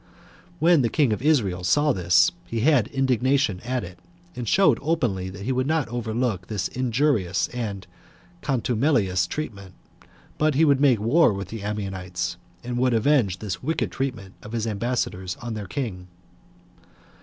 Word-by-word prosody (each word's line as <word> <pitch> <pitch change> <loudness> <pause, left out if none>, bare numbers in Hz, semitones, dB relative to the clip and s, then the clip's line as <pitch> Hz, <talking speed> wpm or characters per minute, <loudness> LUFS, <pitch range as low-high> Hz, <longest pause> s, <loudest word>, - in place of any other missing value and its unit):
When 170 -1 +4
the 120 - +1
king 140 -5 +2
of 105 - -4
Israel 110 - +1
saw 145 +10 +3
this, 90 0 +4 0.2
he 115 -1 -2
had 135 -5 +4
indignation 130 -5 +1
at 125 +1 -2
it, 90 +1 -10 0.4
and 120 -3 -4
showed 195 0 +4
openly 120 - -1
that 100 +1 -9
he 125 - -1
would 130 +1 0
not 160 -2 +1
overlook 115 -5 -2
this 100 -4 -2
injurious 120 -7 0
and 105 -6 -5 0.6
contumelious 115 - +1
treatment, 100 - -6 0.6
but 155 -2 +2
would 140 -2 +4
make 130 -6 +4
war 120 +7 +4
with 100 0 -6
the 115 -2 -6
Ammonites, 95 -4 -4 0.3
and 120 0 -3
would 125 -1 +2
avenge 115 -6 +2
this 95 -3 -5
wicked 160 +5 -1
treatment 115 -8 -4
of 105 - -10
his 115 -1 -1
ambassadors 105 -4 -2
on 120 -1 -6
their 105 -3 -5
king. 95 -8 -4
115 Hz, 155 wpm, -24 LUFS, 95-135 Hz, 0.6 s, When